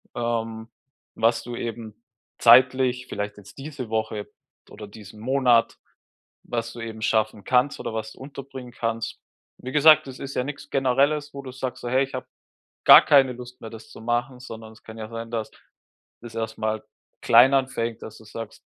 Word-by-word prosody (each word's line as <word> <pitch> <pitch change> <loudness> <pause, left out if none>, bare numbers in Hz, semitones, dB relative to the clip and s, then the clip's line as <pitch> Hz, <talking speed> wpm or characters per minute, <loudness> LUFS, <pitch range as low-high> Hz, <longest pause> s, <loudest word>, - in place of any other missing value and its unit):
Ähm, 115 -1 -3 0.5
was 115 +1 +2
du 120 0 -6
eben 115 -2 -6 0.4
zeitlich, 130 +1 +5
vielleicht 105 0 -4
jetzt 100 -1 -15
diese 135 -4 -7
Woche 110 -1 -3 0.4
oder 105 -1 -10
diesen 105 0 -13
Monat, 125 -1 +3 0.7
was 115 -1 -4
du 120 - -8
eben 110 -1 -7
schaffen 110 -2 0
kannst 130 +2 +2
oder - - -5
was 110 0 -4
du - - -20
unterbringen 135 -2 -9
kannst. 115 -1 -3 0.4
Wie 130 - -7
gesagt, 155 +1 +6
das 130 -1 -8
ist 140 0 -6
ja 125 - +1
nix 145 +1 -7
Generelles, 140 +3 +1
wo 140 0 -7
du 130 - -8
sagst: 125 -1 -5
So, 120 - -4
„Hey, 130 +2 +3
ich 130 - -9
habe 130 - -6 0.6
gar - - +10
keine 135 -3 +5
Lust 125 +1 -11
mehr, 110 - -8
das 110 -1 -12
zu - - -12
machen,” 120 +2 -2
sondern 110 -3 -10
es - - -19
kann 110 - -11
ja 110 - -6
sein, 115 0 -6
dass 115 -2 -3 0.7
das 115 -1 -10
erstmal 110 -1 -3 0.4
klein 120 +4 +6
anfängt, 120 -4 0
dass 110 - -9
du 110 - -16
sagst, 115 +1 -9
120 Hz, 180 wpm, -24 LUFS, 110-130 Hz, 0.7 s, gar